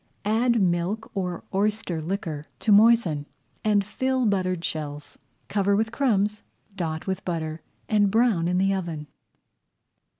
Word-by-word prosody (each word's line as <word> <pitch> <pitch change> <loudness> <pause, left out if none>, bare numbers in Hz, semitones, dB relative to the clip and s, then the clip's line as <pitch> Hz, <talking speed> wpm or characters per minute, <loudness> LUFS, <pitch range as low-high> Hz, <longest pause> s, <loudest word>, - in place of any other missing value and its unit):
Add 230 +3 +2
milk 185 +4 0
or 180 -3 -3
oyster 200 -4 0
liquor 160 -4 -4
to 220 - +2
moisten 205 -9 +5 0.4
and 205 -2 +3
fill 260 +4 0
buttered 185 -4 0
shells. 145 -2 -5 0.3
Cover 200 -1 +2
with 220 +2 0
crumbs, 210 -5 +1 0.3
dot 160 -4 -3
with 190 -1 -3
butter, 160 -2 -3 0.3
and 205 -2 +3
brown 215 -6 +2
in 180 +1 +1
the 195 +1 +2
oven. 170 -5 -4
195 Hz, 130 wpm, -25 LUFS, 170-215 Hz, 0.4 s, moisten